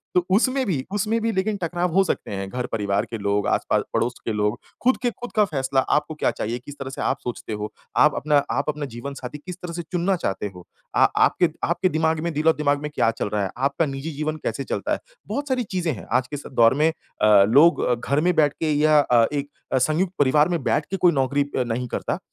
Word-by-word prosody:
तो 180 Hz, -1 st, +3 dB
उसमें 260 Hz, +4 st, +2 dB
भी 145 Hz, -10 st, -1 dB
उसमें 215 Hz, +3 st, 0 dB
भी 225 Hz, 0 st, 0 dB
लेकिन 200 Hz, +1 st, -1 dB
टकराव 175 Hz, 0 st, -1 dB
हो 195 Hz, +2 st, +5 dB
सकते 175 Hz, -, -3 dB
हैं, 95 Hz, -1 st, -4 dB
घर-परिवार 105 Hz, -5 st, -1 dB
के 115 Hz, -, -6 dB
लोग 100 Hz, 0 st, 0 dB
आस-पास -, -, +1 dB
पड़ोस 115 Hz, +2 st, +1 dB
के 115 Hz, -, -1 dB
लोग। 105 Hz, +2 st, 0 dB, 0.3 s
ख़ुद 260 Hz, -, +4 dB
के 245 Hz, -, +3 dB
ख़ुद 245 Hz, +3 st, -9 dB
का 210 Hz, -1 st, +5 dB
फैसला 135 Hz, -5 st, 0 dB, 0.2 s
आपको 150 Hz, +1 st, -3 dB
क्या -, -, +1 dB
चाहिए? 120 Hz, +3 st, -3 dB
किस 140 Hz, +3 st, -11 dB
तरह 135 Hz, -1 st, -5 dB
से 135 Hz, -, -6 dB
आप -, -, 0 dB
सोचते 120 Hz, -2 st, -5 dB
हो? 105 Hz, +1 st, -4 dB, 0.3 s
आप 150 Hz, -, +5 dB
अपना 150 Hz, 0 st, +1 dB, 0.2 s
आप 140 Hz, +6 st, -1 dB
अपना 150 Hz, -1 st, -2 dB
जीवन 140 Hz, +4 st, -6 dB
साथी 130 Hz, +1 st, -7 dB
किस 180 Hz, +4 st, -8 dB
तरह 175 Hz, -1 st, -6 dB
से 175 Hz, -, -3 dB
चुनना 180 Hz, +2 st, +1 dB
चाहते 105 Hz, -, -2 dB
हो? 90 Hz, -, -12 dB, 0.3 s
आ -, -, +6 dB, 0.2 s
आपके 175 Hz, -2 st, +2 dB
आपके 175 Hz, +2 st, +1 dB
दिमाग 160 Hz, -1 st, +1 dB
में 170 Hz, -, -1 dB
दिल-ओ-दिमाग 150 Hz, -2 st, +2 dB
में 150 Hz, -, -3 dB
क्या 115 Hz, -, +3 dB
चल -, -, -1 dB
रहा 105 Hz, -1 st, -1 dB
है? 95 Hz, -, -2 dB
आपका 140 Hz, +5 st, +1 dB
निजी 140 Hz, +2 st, -5 dB
जीवन 155 Hz, +1 st, -3 dB
कैसे -, -, -2 dB
चलता -, -, -3 dB
है? -, -, -1 dB, 0.3 s
बहुत 285 Hz, +1 st, -3 dB
सारी 255 Hz, -1 st, +1 dB
चीज़ें 170 Hz, -5 st, 0 dB
हैं। 105 Hz, -, -9 dB
आज 130 Hz, 0 st, +2 dB
के 145 Hz, -, -6 dB
इस 145 Hz, -, -7 dB
दौर 115 Hz, -1 st, +5 dB
में 155 Hz, +3 st, +3 dB
अ, 105 Hz, -10 st, +3 dB
लोग 150 Hz, +8 st, +6 dB
अ, 125 Hz, -, +2 dB
घर 140 Hz, +5 st, 0 dB
में 180 Hz, +1 st, +2 dB
बैठ 150 Hz, -3 st, +3 dB
के 155 Hz, -2 st, 0 dB
या 150 Hz, +1 st, +4 dB
अ, 120 Hz, -5 st, +4 dB
एक 145 Hz, 0 st, -2 dB, 0.2 s
अ, -, -, +4 dB
संयुक्त 155 Hz, +8 st, +1 dB
परिवार 150 Hz, +3 st, +4 dB
में 170 Hz, -3 st, -1 dB
बैठ 150 Hz, +4 st, +1 dB
के 195 Hz, -, -1 dB
कोई 175 Hz, -1 st, +4 dB
नौकरी 140 Hz, -1 st, +1 dB
अ, 130 Hz, -, +2 dB
नहीं 120 Hz, +1 st, -3 dB
करता। -, -, -3 dB
145 Hz, 240 wpm, -23 LUFS, 125-170 Hz, 0.3 s, आ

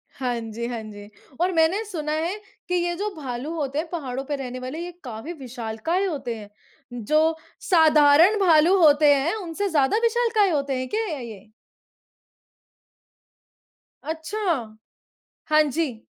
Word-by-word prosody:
हाँ 245 Hz, -3 st, -2 dB
जी, 225 Hz, +1 st, -5 dB
हाँ 235 Hz, -2 st, -4 dB
जी। 205 Hz, -1 st, -11 dB, 0.3 s
और 365 Hz, +1 st, +2 dB
मैंने 330 Hz, +6 st, +2 dB
सुना 310 Hz, -7 st, -4 dB
है 330 Hz, +5 st, -1 dB, 0.3 s
कि 360 Hz, -, 0 dB
ये 345 Hz, 0 st, 0 dB
जो 415 Hz, +3 st, -2 dB
भालू 275 Hz, +1 st, -5 dB
होते 285 Hz, -3 st, -3 dB
हैं 330 Hz, -, -3 dB
पहाड़ों 270 Hz, -6 st, -4 dB
पे 290 Hz, +1 st, -2 dB
रहने 255 Hz, -2 st, -6 dB
वाले, 260 Hz, +6 st, -6 dB
ये 350 Hz, +1 st, -5 dB
काफ़ी 245 Hz, +7 st, -7 dB
विशालकाय 250 Hz, -, -3 dB
होते 275 Hz, -10 st, -3 dB
हैं, 205 Hz, -1 st, -11 dB, 0.4 s
जो 310 Hz, +8 st, +1 dB, 0.3 s
साधारण 320 Hz, +3 st, +6 dB
भालू 345 Hz, 0 st, +5 dB
होते 295 Hz, -1 st, +6 dB
हैं 285 Hz, +8 st, 0 dB
उनसे 390 Hz, 0 st, -3 dB
ज़्यादा 295 Hz, +4 st, +2 dB
विशालकाय 460 Hz, -3 st, +2 dB
होते 280 Hz, -4 st, -1 dB
हैं, 255 Hz, -, -3 dB
क्या 445 Hz, +1 st, -1 dB
या 295 Hz, -, -5 dB
ये? 220 Hz, -4 st, -10 dB, 2.5 s
अच्छा। 320 Hz, -, -3 dB, 0.7 s
हाँ 310 Hz, 0 st, +6 dB
जी। 265 Hz, -7 st, -3 dB
305 Hz, 145 wpm, -24 LUFS, 255-345 Hz, 2.5 s, साधारण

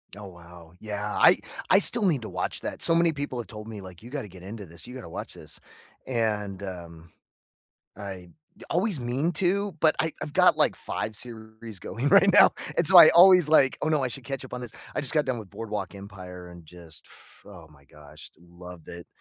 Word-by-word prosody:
Oh, 100 Hz, 0 st, -10 dB
wow. 85 Hz, -2 st, -15 dB
Yeah, 105 Hz, -1 st, -5 dB
I -, -, +6 dB, 0.3 s
I 195 Hz, -, +6 dB
still 220 Hz, +2 st, +5 dB
need 155 Hz, -9 st, +1 dB
to 110 Hz, -, -7 dB
watch -, -, -4 dB
that. -, -, -6 dB
So 165 Hz, -, +3 dB
many 170 Hz, 0 st, +3 dB
people 145 Hz, -4 st, -5 dB
have 120 Hz, -, -6 dB
told 105 Hz, -1 st, -10 dB
me, 110 Hz, -3 st, -8 dB
like, 90 Hz, -3 st, -12 dB
"You 120 Hz, -, -12 dB
gotta 135 Hz, -6 st, -6 dB
get 90 Hz, -1 st, -14 dB
into 100 Hz, +2 st, -8 dB
this. 85 Hz, +1 st, -10 dB
You 125 Hz, -, -10 dB
gotta 90 Hz, -10 st, -9 dB
watch -, -, -6 dB
this." -, -, -6 dB, 0.5 s
And, 105 Hz, -5 st, -2 dB
um, 85 Hz, -3 st, -9 dB, 0.9 s
I 95 Hz, -3 st, -8 dB, 0.4 s
always 180 Hz, -1 st, 0 dB
mean 130 Hz, +7 st, -1 dB
to, 195 Hz, +3 st, 0 dB
but 155 Hz, 0 st, +3 dB
I 160 Hz, -, 0 dB
I've 150 Hz, -, -6 dB
got, -, -, +4 dB
like, -, -, +2 dB
5 110 Hz, 0 st, -5 dB
series 110 Hz, -2 st, -9 dB
going 125 Hz, +9 st, -3 dB
right 200 Hz, 0 st, +6 dB
now. -, -, +7 dB, 0.3 s
And, 170 Hz, -, +2 dB
so, 185 Hz, +2 st, +6 dB
I 170 Hz, -, +11 dB
always 180 Hz, -1 st, +7 dB
like, 140 Hz, -4 st, +4 dB
"Oh, -, -, -1 dB
no. 155 Hz, -3 st, +1 dB
I 130 Hz, -, -1 dB
should 130 Hz, 0 st, -6 dB
catch 135 Hz, +1 st, -5 dB
up 130 Hz, -, -11 dB
on 125 Hz, -, -4 dB
this." 120 Hz, -, -7 dB, 0.2 s
I -, -, -2 dB
just 135 Hz, -, +1 dB
got 150 Hz, -2 st, +2 dB
done 130 Hz, -3 st, -2 dB
with 105 Hz, -4 st, -11 dB
Boardwalk 105 Hz, -1 st, -6 dB
Empire 95 Hz, -3 st, -11 dB
and 85 Hz, -2 st, -14 dB
just, 85 Hz, -2 st, -13 dB
f -, -, -18 dB
oh, 90 Hz, -5 st, -13 dB
my 70 Hz, -2 st, -22 dB
gosh. 75 Hz, +1 st, -14 dB
Loved 85 Hz, 0 st, -14 dB
it. 85 Hz, 0 st, -10 dB
110 Hz, 220 wpm, -26 LUFS, 90-145 Hz, 0.9 s, I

